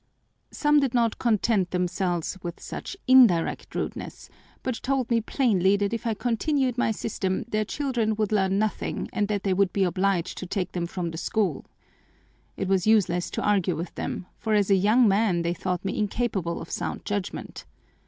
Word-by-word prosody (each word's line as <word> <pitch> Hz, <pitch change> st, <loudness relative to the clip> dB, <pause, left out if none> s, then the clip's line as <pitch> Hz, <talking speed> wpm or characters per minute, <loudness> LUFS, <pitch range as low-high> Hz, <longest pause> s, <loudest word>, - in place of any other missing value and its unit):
Some 295 Hz, 0 st, +3 dB
did 270 Hz, -3 st, 0 dB
not 230 Hz, -2 st, +1 dB
content 215 Hz, -4 st, +2 dB
themselves 180 Hz, -1 st, -1 dB
with 170 Hz, -1 st, -6 dB
such 385 Hz, -, -7 dB
indirect 240 Hz, -10 st, +4 dB
rudeness, -, -, -5 dB, 0.3 s
but 255 Hz, -3 st, -3 dB
told 260 Hz, -2 st, -1 dB
me 230 Hz, -1 st, +3 dB
plainly 205 Hz, -6 st, +2 dB
that 200 Hz, +2 st, -1 dB
if 230 Hz, +1 st, -3 dB
I 225 Hz, -, 0 dB
continued 255 Hz, +3 st, 0 dB
my 245 Hz, -, +1 dB
system 195 Hz, -3 st, -2 dB
their 215 Hz, -1 st, +1 dB
children 240 Hz, -5 st, -1 dB
would 215 Hz, -1 st, -1 dB
learn 195 Hz, -2 st, +2 dB
nothing 215 Hz, 0 st, -2 dB
and 205 Hz, -, 0 dB
that 205 Hz, -2 st, -2 dB
they 195 Hz, -, +1 dB
would 190 Hz, -1 st, +2 dB
be 195 Hz, -, +1 dB
obliged 185 Hz, 0 st, 0 dB
to 185 Hz, -, -6 dB
take 185 Hz, -1 st, -2 dB
them 175 Hz, -1 st, -2 dB
from 175 Hz, -1 st, -4 dB
the 165 Hz, -, -6 dB
school 195 Hz, -9 st, -1 dB, 0.9 s
It 195 Hz, -, -2 dB
was 190 Hz, 0 st, +1 dB
useless 185 Hz, -5 st, +3 dB
to -, -, -3 dB
argue 195 Hz, -4 st, +2 dB
with 170 Hz, +3 st, -5 dB
them, -, -, -4 dB
for 220 Hz, -2 st, 0 dB
as 205 Hz, -1 st, +2 dB
a -, -, +7 dB
young 215 Hz, +6 st, +4 dB
man 195 Hz, -4 st, +2 dB
they 170 Hz, +1 st, 0 dB
thought 180 Hz, +1 st, -3 dB
me 195 Hz, -, -2 dB
incapable 205 Hz, -5 st, -1 dB
of -, -, -9 dB
sound -, -, -4 dB
judgment. 205 Hz, -1 st, -4 dB
200 Hz, 185 wpm, -26 LUFS, 185-230 Hz, 0.9 s, a